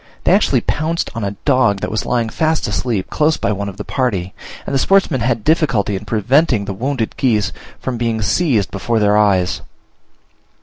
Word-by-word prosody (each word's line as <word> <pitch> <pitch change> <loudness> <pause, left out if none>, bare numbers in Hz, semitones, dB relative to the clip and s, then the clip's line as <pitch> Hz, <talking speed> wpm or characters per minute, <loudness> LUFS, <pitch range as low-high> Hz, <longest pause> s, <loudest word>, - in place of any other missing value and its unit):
They - - +3
actually - - +3
pounced 160 +3 -2
on 115 -2 -4
a 100 0 -3
dog 130 -8 +3
that - - -3
was 110 - -2
lying 120 -2 0
fast 160 +5 0
asleep 105 -1 -2
close 155 0 +2
by 100 - -1
one 100 0 -3
of 95 - -11
the 105 - -5
party; 100 -10 -2 0.3
and - - -4
the 135 - +2
sportsmen 180 -7 +2
had 115 -2 0
difficulty 140 -11 +1
in 100 +2 -6
preventing 120 +2 +2
the 100 - -4
wounded 120 +2 -2
geese 105 -7 +1 0.3
from 125 -3 -4
being 115 -2 -1
seized 120 - +1
before 115 +4 -1
their 105 -1 +3
eyes. 100 -4 +2
115 Hz, 185 wpm, -18 LUFS, 100-135 Hz, 0.3 s, They